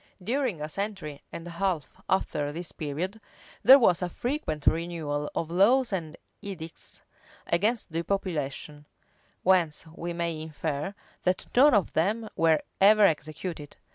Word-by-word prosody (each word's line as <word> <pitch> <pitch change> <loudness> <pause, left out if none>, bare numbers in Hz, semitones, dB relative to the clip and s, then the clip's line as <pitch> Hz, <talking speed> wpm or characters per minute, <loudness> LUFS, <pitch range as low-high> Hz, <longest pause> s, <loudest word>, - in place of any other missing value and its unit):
During 245 - -1
a - - -2
century 185 -5 -4
and 165 - -7
a 175 - -7
half 170 -4 -1 0.2
after 145 -6 0
this 170 +2 -6
period, 170 +8 -4 0.4
there 265 +3 +10
was 190 -8 +3
a 180 - -1
frequent 240 - -3
renewal 160 -3 0
of 165 0 -2
laws 225 +7 +4
and 165 -4 -3 0.2
edicts 175 -6 -8 0.4
against 210 +2 +1
depopulation; 155 -4 -3 0.6
whence 175 -5 +2
we 170 +1 -5
may 170 -2 -2
infer, 155 +3 -4 0.3
that 180 0 0
none 270 +1 +7
of 200 -5 +1
them 210 +7 0
were 160 -1 +3 0.2
ever 210 +2 +7
executed. 155 -2 -1
170 Hz, 135 wpm, -28 LUFS, 155-200 Hz, 0.6 s, there